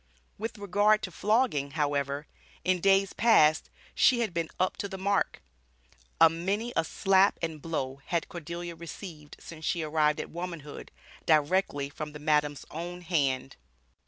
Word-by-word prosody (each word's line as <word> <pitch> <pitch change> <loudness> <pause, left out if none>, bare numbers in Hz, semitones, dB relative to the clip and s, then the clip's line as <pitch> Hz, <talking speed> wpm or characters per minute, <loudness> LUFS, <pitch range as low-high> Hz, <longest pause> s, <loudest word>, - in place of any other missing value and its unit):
With 225 +1 -4
regard 205 +2 +2
to 185 - -4
flogging, 205 - +1
however, 145 -1 -1 0.4
in 180 +1 +2
days 195 0 +3
past, 155 -9 +4 0.2
she 245 -2 +4
had 220 -6 -1
been 165 -1 -2
up 185 - +1
to 200 - -4
the 190 - -6
mark. 200 +1 0 0.8
"A 165 - +9
many 195 +9 -2
a - - +3
slap 195 +4 +3
and 160 -2 -3
blow" 140 -4 -3
had 170 -2 -1
Cordelia 170 +1 -6
received 165 -2 -9
since 160 -1 -11
she 170 +1 0
arrived 150 -1 +1
at - - -5
womanhood, 170 -4 -7 0.4
directly 155 -2 +2
from 150 +1 -7
the 150 - -8
madam's 150 -1 +1
own 175 +3 -6
hand. 135 -6 -1
165 Hz, 150 wpm, -29 LUFS, 150-195 Hz, 0.8 s, A